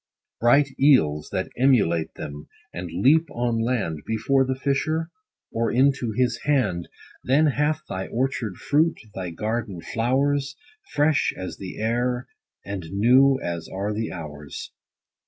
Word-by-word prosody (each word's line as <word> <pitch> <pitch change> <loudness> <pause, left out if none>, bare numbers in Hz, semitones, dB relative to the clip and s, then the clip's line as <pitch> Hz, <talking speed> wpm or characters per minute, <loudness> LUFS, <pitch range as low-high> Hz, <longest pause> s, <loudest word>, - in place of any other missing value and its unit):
Bright 135 +5 +4
eels 80 - +4
that 95 - -2
emulate 85 -12 +3
them, 75 +1 -7 0.3
and 85 0 -5
leap 150 - +3
on 120 -3 -1
land, 110 -11 -1
Before 130 +5 +1
the 130 0 -1
fisher, 150 +4 -1 0.4
or 115 -1 0
into 130 -2 +2
his 120 +1 +1
hand, 105 -13 0 0.3
Then 140 +6 +3
hath 150 +1 0
thy 95 0 -4
orchard 120 -5 -2
fruit, 155 +3 +1
thy 95 -2 -4
garden 105 +1 -3
flowers, 135 +8 0 0.4
Fresh 150 0 +2
as 95 -1 -6
the 95 -2 -8
air, 120 +3 0 0.4
and 95 -5 -5
new 130 +7 +4
as 85 -1 -4
are 100 +2 -3
the 110 +1 -3
hours. 75 -4 -8
120 Hz, 135 wpm, -24 LUFS, 95-135 Hz, 0.4 s, Bright